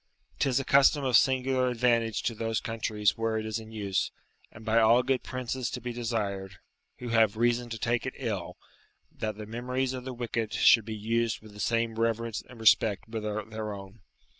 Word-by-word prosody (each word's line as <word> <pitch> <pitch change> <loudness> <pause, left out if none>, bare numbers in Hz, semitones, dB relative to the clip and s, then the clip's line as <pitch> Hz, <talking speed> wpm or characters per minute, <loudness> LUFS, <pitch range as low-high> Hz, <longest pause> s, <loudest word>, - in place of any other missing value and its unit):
'Tis 135 -2 +2
a 135 - -4
custom 140 +2 +5
of 130 -2 +2
singular 130 0 +3
advantage 115 -2 +1
to 120 - 0
those 115 0 -1
countries 110 -2 0
where 115 -1 0
it 110 - -3
is 110 +1 -2
in 110 0 -11
use, 100 -4 -1 0.4
and 110 - -13
by 115 +1 +3
all 115 +2 +5
good 130 0 +1
princes 130 -1 -3
to 125 - -5
be 120 0 -5
desired, 100 -5 -3 0.4
who 125 - -6
have 110 -2 +3
reason 120 +1 +1
to 115 - -4
take 120 +2 0
it 130 - -5
ill, 110 -9 -4 0.5
that 110 -1 -4
the 105 - -7
memories 125 +4 -2
of 130 -1 -5
the 130 - -5
wicked 115 -2 -3
should 115 -3 +5
be 110 -1 -5
used 115 +1 0
with 110 -1 -14
the 105 - -12
same 115 +1 0
reverence 115 -1 -1
and 125 -2 -13
respect 110 -2 +3
with 110 -1 -4
their 105 0 -4
own. 100 +2 -11
115 Hz, 195 wpm, -28 LUFS, 110-120 Hz, 0.5 s, custom